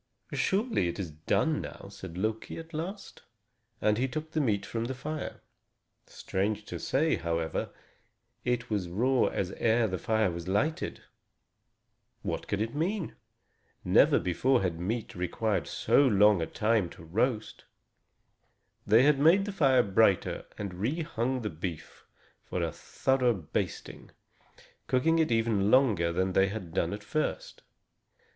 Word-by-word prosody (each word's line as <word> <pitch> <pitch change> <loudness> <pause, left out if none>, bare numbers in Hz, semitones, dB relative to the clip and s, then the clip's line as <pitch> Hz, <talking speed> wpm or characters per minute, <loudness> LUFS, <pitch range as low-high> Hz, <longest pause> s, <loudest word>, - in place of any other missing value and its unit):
"Surely, 200 - +1
it 85 - -4
is 90 -6 -4
done 115 - 0
now," - - -9
said 95 -3 -9
Loki, 110 +3 -3
at 165 +1 -10
last; 190 +6 -6 0.6
and 105 +1 +2
he 130 - +1
took 155 +4 -5
the 155 - 0
meat 105 -7 0
from 115 0 -3
the 130 +2 -4
fire. 155 +3 -5 0.7
Strange 105 +2 -2
to - - -6
say, 155 +4 +1
however, 85 -1 -2 0.7
it 125 -1 -1
was 95 -5 -1
raw 125 +8 +2
as 95 -1 -2
ere 115 0 +3
the 95 -2 -3
fire 110 -2 +1
was 85 +1 -6
lighted. 120 +12 -1 1.2
What - - -3
could 105 0 -1
it 115 +1 -2
mean? 175 +4 -2 0.7
Never - - +5
before 120 +7 +1
had 85 -3 -1
meat 110 +6 -3
required 95 +4 -1
so - - +3
long 105 -4 +5
a 80 - -1
time 110 -4 +1
to - - -12
roast. 110 +6 -1 1.2
They 120 +8 +6
made 165 +8 +4
the 205 - -3
fire 135 -9 +4
brighter 100 -1 +2
and 100 -3 -5
re 125 - -2
hung 130 -4 -2
the 105 - -2
beef 80 0 -7 0.4
for - - -3
a - - -1
thorough 130 -3 0
basting, 85 -6 -4 0.8
cooking 165 +6 +2
it 160 -6 +2
even 110 -3 +2
longer 110 -10 +4
than 95 +2 0
they 95 +1 +4
had 95 -5 -6
done 85 -2 0
at 105 +1 -6
first. 155 +8 -3
110 Hz, 145 wpm, -29 LUFS, 95-135 Hz, 1.2 s, They